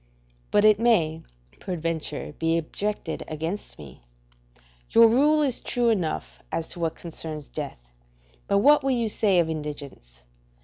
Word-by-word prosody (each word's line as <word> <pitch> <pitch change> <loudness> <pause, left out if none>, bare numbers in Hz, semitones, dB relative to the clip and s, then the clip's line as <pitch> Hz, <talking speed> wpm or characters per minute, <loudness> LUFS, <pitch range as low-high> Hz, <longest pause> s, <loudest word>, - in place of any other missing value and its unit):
But 210 0 +3
it 215 -1 +6
may, 170 -9 +2 0.4
peradventure, 165 -4 -3
be 165 0 +2
objected 205 +6 -3
against 160 +6 -5
me: 70 -6 -12 0.9
Your 230 0 +7
rule 295 +6 +4
is 265 -4 -1
true 240 -1 0
enough 80 - -2
as 165 - -2
to - - -6
what 165 -1 -1
concerns 155 -3 -7
death; - - -7 0.5
but 200 - +2
what 290 +7 +5
will 270 - 0
you 235 -4 +1
say 205 -3 +2
of 170 -2 +3
indigence? 145 - -7
165 Hz, 140 wpm, -25 LUFS, 155-220 Hz, 0.9 s, Your